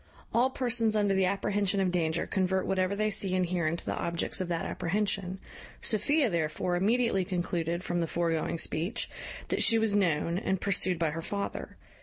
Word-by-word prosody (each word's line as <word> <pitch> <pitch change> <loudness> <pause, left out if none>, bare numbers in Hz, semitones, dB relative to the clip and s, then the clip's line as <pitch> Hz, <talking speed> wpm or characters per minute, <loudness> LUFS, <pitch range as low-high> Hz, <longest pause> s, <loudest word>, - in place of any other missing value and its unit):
All 245 +3 +3
persons 235 -4 +1
under 205 -2 +2
the 190 -1 +3
apprehension 200 0 0
of 190 -2 +1
danger 165 -2 0
convert 190 0 0
whatever 190 +1 0
they 215 +1 0
see 190 -2 0
and 185 -1 +2
hear 175 -2 -1
into 165 +2 -3
the - - -1
objects 170 +2 -2
of 185 - -2
that 170 -1 -2
apprehension. 190 0 -1 0.4
Sophia 270 +7 +2
therefore 170 -1 -1
immediately 210 +1 +2
concluded, 175 -1 -2
from 175 0 -1
the 165 - -1
foregoing 165 -1 -1
speech, 175 +9 -2 0.4
that - - +1
she 230 - +6
was 220 -2 +1
known, 170 -3 +1
and 190 -1 -1
pursued 185 -2 +2
by 165 -2 0
her 165 +2 -4
father. 200 +4 -5
185 Hz, 180 wpm, -29 LUFS, 170-205 Hz, 0.4 s, she